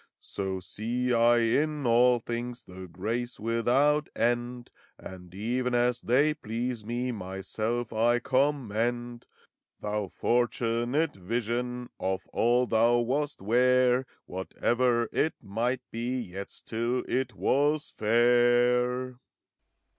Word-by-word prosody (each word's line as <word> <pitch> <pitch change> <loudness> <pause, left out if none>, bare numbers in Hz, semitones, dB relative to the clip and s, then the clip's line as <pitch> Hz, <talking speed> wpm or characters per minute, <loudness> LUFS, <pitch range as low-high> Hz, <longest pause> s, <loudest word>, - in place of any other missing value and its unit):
So 95 -1 -4
see 120 +6 -2
I 120 +1 +5
in 145 +5 +1
all 120 +1 +5
things 120 +1 -5
The 95 0 -10
grace 115 +8 -4
without 125 +7 +2
end, 120 +1 -1 0.3
And 90 -1 -11
even 125 +4 -1
as 120 0 +1
they 140 +6 +3
please 120 -3 -4
me, 120 +3 -2
Myself 110 +4 -4
I 120 +2 +3
commend. 120 -3 -1 0.5
Thou 105 -1 -2
fortunate 120 - 0
Vision, 120 +5 -3
Of 95 0 -2
all 120 +2 +3
thou 115 +1 +3
wast 135 +1 -1
'ware. 125 +3 +3 0.2
Whatever 120 +5 0
it 160 - 0
might 120 +6 -2
be, 120 +3 -2
Yet 100 -3 -7
still 120 +3 -3
it 125 -3 -1
was 145 +7 +1
fair! 120 +2 +2
120 Hz, 110 wpm, -28 LUFS, 115-125 Hz, 0.5 s, I